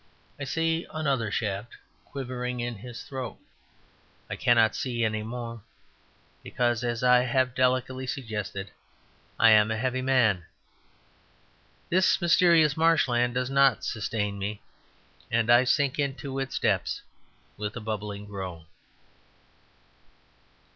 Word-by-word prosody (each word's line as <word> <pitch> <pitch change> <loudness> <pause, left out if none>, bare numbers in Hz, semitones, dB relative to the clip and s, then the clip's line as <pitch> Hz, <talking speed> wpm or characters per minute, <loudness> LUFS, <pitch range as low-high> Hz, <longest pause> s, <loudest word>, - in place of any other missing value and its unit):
I 145 - -4
see 165 +4 -1
another 140 -8 -1
shaft 105 +1 -3
stand - - -17 0.2
quivering 125 -2 -5
in 120 0 -2
his 120 +3 -9
throat. 130 -5 -6 0.9
I - - -2
cannot 115 -2 +3
see 120 -3 -1
any 110 -1 -1
more, 115 0 -6 0.8
because, 120 -1 -1
as 120 0 -2
I 125 0 +6
have 130 0 +1
delicately 130 0 0
suggested, 105 -6 -5 0.7
I 115 - +7
am 105 0 +6
a 110 - -1
heavy 130 +2 -1
man. 120 -9 +2 1.4
This 185 +2 +3
mysterious 170 -4 +4
marshland 125 -7 +2
does 125 +1 -1
not 135 -3 +4
sustain 105 -2 -2
me, 100 +1 -4 0.7
and 115 0 +2
I 120 +2 +6
sink 140 +1 +1
into 140 -1 -2
its 135 0 -3
depths - - 0 0.5
with 105 0 -5
a - - -4
bubbling 105 -2 -5
groan. 95 -5 -7
120 Hz, 120 wpm, -27 LUFS, 110-130 Hz, 1.4 s, I